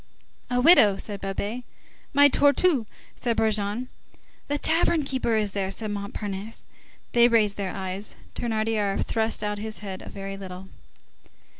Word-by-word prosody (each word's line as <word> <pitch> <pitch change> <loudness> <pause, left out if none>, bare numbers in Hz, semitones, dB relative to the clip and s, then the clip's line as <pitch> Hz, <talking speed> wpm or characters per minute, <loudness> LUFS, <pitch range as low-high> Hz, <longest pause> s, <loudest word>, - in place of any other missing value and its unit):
"A 245 0 +1
widow,"37 235 - +6
said 200 -1 -6
Babet. 205 +5 -3 0.5
"My 285 0 +7
tortouse!"38 285 -1 +3 0.3
said 235 -2 -1
Brujon. 215 +2 0 0.6
"The 290 - 0
tavern 325 +1 +2
keeper 260 -4 0
is 210 -2 +1
there," 195 -1 -2
said 215 +2 -4
Montparnasse. 205 +1 -5 0.5
They 240 0 +6
raised 215 -4 +3
their 195 -2 -3
eyes. 190 +1 -5 0.2
Thénardier 220 -3 -1
thrust 220 -1 -1
out 210 0 -2
his 215 +1 -5
head 190 -1 -6
a - - -9
very 195 0 -6
little. 190 0 -9
215 Hz, 140 wpm, -25 LUFS, 200-240 Hz, 0.6 s, My